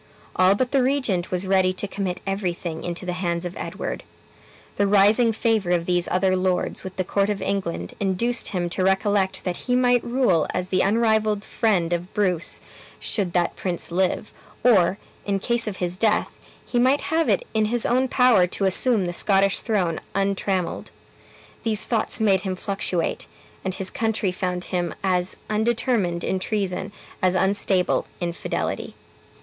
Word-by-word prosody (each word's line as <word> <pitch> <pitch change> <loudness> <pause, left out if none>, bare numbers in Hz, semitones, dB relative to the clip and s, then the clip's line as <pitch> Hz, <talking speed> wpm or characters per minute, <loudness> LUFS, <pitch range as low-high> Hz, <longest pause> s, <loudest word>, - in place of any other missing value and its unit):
All 185 +2 +4
but 250 +4 -1
the 275 -2 +3
regent 250 -9 0
was 180 +1 -1
ready 190 -1 +3
to 195 +2 -4
commit 195 -2 -4
everything 180 -4 -3
into 175 +1 -4
the 180 - -2
hands 175 -1 -2
of 175 - -5
Edward. - - -5 0.8
The 200 - +2
rising 210 +4 +5
favor 220 -4 0
of 175 -1 +1
these 175 -1 +1
other 185 +1 +2
lords 185 -1 -1
with 190 -1 -7
the 185 - -1
court 200 +2 0
of 205 -1 -1
England 195 -4 -3
induced 210 +5 0
him 180 -3 -2
to 185 - -1
recollect 190 0 +1
that 180 -1 -2
he 250 - +2
might 245 -1 +3
rule 240 - +2
as 180 0 -2
the 185 - +2
unrivaled 215 0 +2
friend 180 -8 0
of 175 +2 -3
Bruce, 180 -5 0 0.4
should 190 -5 -1
that 175 -1 +1
prince 175 -2 -2
live; 185 +3 0 0.3
or, 195 -6 +4 0.3
in 200 -1 0
case 235 +3 +1
of 200 -3 -4
his 180 0 -2
death, 215 +1 0 0.3
he 245 - -1
might 260 +4 +3
have 325 0 +2
it - - +1
in 215 -1 +2
his 235 +2 +1
own 255 +2 +2
power 245 -8 +4
to 195 +2 -2
assume 200 +2 +3
the 175 - -3
Scottish 195 +1 +2
throne 185 -8 -1 0.2
untrammeled. 195 -2 -1 0.7
These 220 -2 +1
thoughts 225 -3 0
made 195 -4 +3
him 190 -2 -3
fluctuate, 185 -3 -2 0.4
and 190 -1 -3
his 190 -1 0
country 220 -4 0
found 180 -1 -3
him 175 -2 -2
as 180 -1 +1
undetermined 215 -5 0
in 190 - -1
treason 195 -1 -2 0.3
as 185 -1 +2
unstable 190 -1 +2
in 175 -1 -2
fidelity. - - -4
195 Hz, 165 wpm, -23 LUFS, 180-220 Hz, 0.8 s, rising